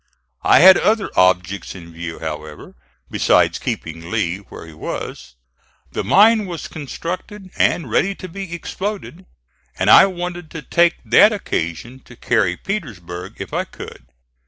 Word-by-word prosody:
I - - +5
had 190 +2 +9
other 215 -2 +1
objects 90 +2 +1
in 85 -2 -12
view, 85 0 -6
however, 75 -1 -7 0.4
besides - - +2
keeping 80 +1 -5
Lee 95 -4 -1
where 100 -4 -12
he 80 - -13
was. 65 -4 -7 0.6
The - - -3
mine 215 +1 +4
was 170 -3 -6
constructed 185 - -7
and 165 -6 +1
ready 195 - +1
to 185 - -9
be 190 0 -8
exploded, 190 +1 -6 0.5
and - - +3
I 195 - +9
wanted 175 -2 -6
to 150 - -8
take 170 0 +3
that 210 - +6
occasion 120 - -4
to 125 - -14
carry 105 -7 0
Petersburg 95 - -6
if - - -8
I - - 0
could. - - -12
140 Hz, 145 wpm, -19 LUFS, -, 0.6 s, had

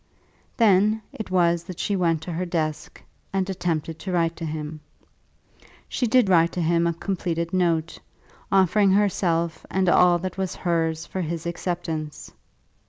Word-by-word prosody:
Then 215 0 +4
it 220 - -6
was 170 -2 +2
that 185 -2 -8
she 205 - 0
went 165 -4 +1
to 175 - -6
her 170 +2 -2
desk, 160 -4 -3 0.3
and 190 -1 0
attempted 165 -4 -2
to 185 +3 -5
write 165 -2 +1
to 165 - -5
him. 155 0 -5 1.1
She 245 - -1
did 245 -1 +4
write 170 -3 +4
to 180 - -2
him 170 +1 +2
a 170 - 0
completed 170 -2 -3
note, 170 -3 0 0.5
offering 195 +1 +4
herself 170 -5 +1
and 190 -1 0
all 175 0 +5
that 185 +2 -5
was 190 -2 -2
hers 165 -2 -1
for 190 - -4
his 165 0 -4
acceptance. 170 -3 -4
175 Hz, 155 wpm, -24 LUFS, 165-190 Hz, 1.1 s, all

